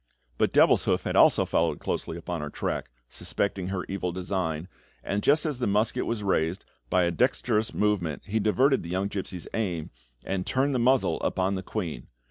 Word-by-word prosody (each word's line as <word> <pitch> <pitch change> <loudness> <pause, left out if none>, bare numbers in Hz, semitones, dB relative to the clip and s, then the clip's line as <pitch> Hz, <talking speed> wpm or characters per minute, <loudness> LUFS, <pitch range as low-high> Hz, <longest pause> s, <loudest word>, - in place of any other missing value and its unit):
But - - +3
Devilshoof - - +4
had - - -2
also - - +6
followed - - +1
closely 80 - -3
upon 85 -1 -4
her 75 - -4
track, - - -3 0.2
suspecting 95 +4 -2
her 95 -1 -3
evil 95 -2 -2
design, 90 -3 -2 0.4
and 100 +1 -1
just 150 +6 +3
as 150 -5 -2
the 125 - 0
musket 105 +3 +1
was 115 -3 -2
raised, 90 -2 0 0.2
by 90 -1 +3
a 85 - +1
dexterous 110 - +1
movement 100 -7 0
he 110 +2 0
diverted 130 +6 +3
the 85 - -8
young 95 +3 -1
gipsy's 95 -3 -5
aim, 90 -8 -2 0.3
and 95 -1 -2
turned 135 +2 +1
the 125 - +1
muzzle 130 +2 +2
upon 95 +1 0
the 95 - -2
queen. 85 - -5
95 Hz, 180 wpm, -27 LUFS, 90-110 Hz, 0.4 s, also